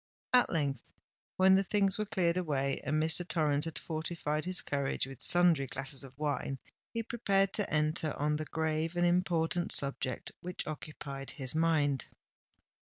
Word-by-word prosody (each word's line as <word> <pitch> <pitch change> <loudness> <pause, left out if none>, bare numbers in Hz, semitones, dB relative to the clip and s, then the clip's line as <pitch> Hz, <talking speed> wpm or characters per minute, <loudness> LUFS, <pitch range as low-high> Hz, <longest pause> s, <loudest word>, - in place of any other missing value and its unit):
At 250 -1 +6
length, 140 -6 -1 0.6
when 190 0 +6
the 195 +1 +4
things 195 0 +1
were 215 - -1
cleared 175 -4 +1
away 140 -6 -1
and 150 - -1
Mr. 160 +3 +2
Torrens 150 -3 +1
had 165 - -4
fortified 155 -1 -3
his 185 0 +4
courage 140 -1 -1
with 135 -2 -10
sundry 175 -6 +4
glasses 135 +1 -3
of 135 -1 -12
wine, 145 -2 -2 0.3
he 230 -1 -3
prepared 195 -4 +1
to 205 - -1
enter 155 0 0
on 150 +1 0
the 155 - -4
grave 160 +1 -2
and 175 0 +2
important 175 -1 +1
subject 135 -3 +2
which 180 0 -5
occupied 140 -2 -7
his 130 -3 -3
mind. 155 -4 +1
155 Hz, 155 wpm, -32 LUFS, 145-175 Hz, 0.6 s, At